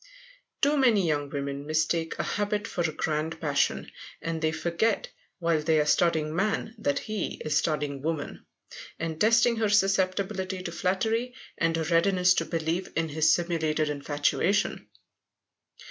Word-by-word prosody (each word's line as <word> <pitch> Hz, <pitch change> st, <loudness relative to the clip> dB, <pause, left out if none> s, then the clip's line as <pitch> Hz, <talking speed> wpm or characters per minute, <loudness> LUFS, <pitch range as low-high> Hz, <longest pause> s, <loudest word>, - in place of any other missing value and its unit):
Too 295 Hz, +1 st, +3 dB
many 230 Hz, -8 st, +4 dB
young 145 Hz, -2 st, 0 dB
women 140 Hz, 0 st, -4 dB
mistake 160 Hz, +1 st, 0 dB
a -, -, -1 dB
habit 210 Hz, +1 st, -1 dB
for 175 Hz, -, -3 dB
a 165 Hz, -2 st, 0 dB
grand 155 Hz, +1 st, -2 dB
passion. 145 Hz, -4 st, 0 dB, 0.3 s
And 165 Hz, -1 st, -4 dB
they 155 Hz, -1 st, +1 dB
forget, 170 Hz, +7 st, 0 dB, 0.3 s
while 165 Hz, -3 st, +1 dB
they 155 Hz, 0 st, +2 dB
are 150 Hz, -, +2 dB
studying 155 Hz, 0 st, +2 dB
man, 215 Hz, +4 st, -1 dB
that 145 Hz, -9 st, 0 dB
he 215 Hz, -3 st, -3 dB
is 150 Hz, -1 st, 0 dB
studying 145 Hz, -3 st, 0 dB
woman, 160 Hz, 0 st, -4 dB, 0.5 s
and 160 Hz, -1 st, -4 dB
testing 230 Hz, +2 st, +4 dB
her 220 Hz, -2 st, +1 dB
susceptibility 190 Hz, -1 st, +1 dB
to 170 Hz, -, -4 dB
flattery 220 Hz, +8 st, -1 dB, 0.2 s
and 165 Hz, 0 st, +1 dB
her 165 Hz, -, 0 dB
readiness 180 Hz, +2 st, +3 dB
to -, -, 0 dB
believe 165 Hz, +2 st, -2 dB
in 165 Hz, 0 st, 0 dB
his 155 Hz, +1 st, +3 dB
simulated 160 Hz, -3 st, 0 dB
infatuation. 145 Hz, +7 st, 0 dB
165 Hz, 145 wpm, -27 LUFS, 155-195 Hz, 0.5 s, many